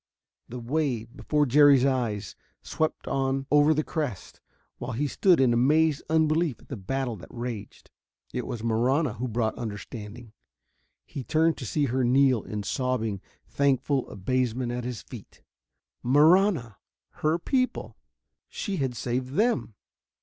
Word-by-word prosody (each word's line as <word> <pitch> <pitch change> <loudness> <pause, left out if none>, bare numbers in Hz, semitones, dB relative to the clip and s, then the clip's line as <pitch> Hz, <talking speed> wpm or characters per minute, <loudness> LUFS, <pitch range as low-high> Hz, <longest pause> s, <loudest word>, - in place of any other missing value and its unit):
The 125 - -6
wave, 125 -2 -2
before 150 +1 +1
Jerry's 140 0 +6
eyes, 115 -7 -1 0.3
swept 155 0 -2
on 135 0 -1
over 150 +1 +5
the 155 0 +1
crest, 140 - -5 0.4
while - - -5
he 140 +6 -1
still 180 +6 +3
stood 170 - +3
in 130 -3 +4
amazed 150 +5 +3
unbelief 160 -2 +2
at - - -21
the 135 - -4
battle 125 +4 -3
that 90 - -12
raged. 120 -4 -7 0.4
It - - -3
was 115 -2 -5
Marahna 125 +7 +1
who 125 +3 -2
brought 115 -1 -1
understanding. 110 +1 -7 0.7
He 135 - -7
turned 160 +4 +2
to - - -6
see 150 -2 +1
her 130 0 0
kneel 130 -1 +4
in 105 0 -5
sobbing, 115 -5 -2 0.3
thankful 140 -1 +1
abasement 125 +3 -1
at 120 0 -4
his 125 -2 -5
feet. - - -12 0.6
Marahna! 150 - +4 0.4
Her 155 +2 +2
people! 255 +8 -1 0.5
She 200 -4 -4
had 130 -3 -1
saved 125 +2 -3
them! 220 - +1
130 Hz, 140 wpm, -27 LUFS, 120-150 Hz, 0.7 s, Jerry's